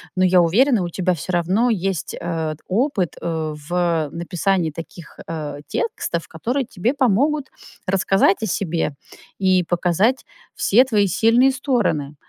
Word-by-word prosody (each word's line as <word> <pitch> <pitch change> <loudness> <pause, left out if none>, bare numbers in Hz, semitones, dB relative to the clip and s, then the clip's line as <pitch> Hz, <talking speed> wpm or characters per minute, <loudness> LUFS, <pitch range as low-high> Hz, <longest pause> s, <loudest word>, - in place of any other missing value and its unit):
но, 185 - +2
я 185 0 +5
уверена, 225 - +3
у - - -2
тебя 185 +1 0
всё 175 +3 -5
равно 185 +8 +2
есть, 195 -6 -2
э, 160 -2 -3
опыт, 200 - 0
э, 160 -2 -2 0.2
в 170 -3 0
написании 175 0 -1
таких, 165 +1 -10
э, 150 -3 -5
текстов, 285 - -3
которые 245 - -2
тебе 230 +2 -1
помогут 275 +3 +1 0.4
рассказать 195 +1 +2
о - - 0
себе 170 -6 -1 0.5
и 185 -1 +3
показать 180 +9 +1 0.3
все 245 +6 +4
твои 210 -6 +2
сильные 230 +8 +4
стороны. 235 - -1
185 Hz, 135 wpm, -21 LUFS, 170-230 Hz, 0.5 s, я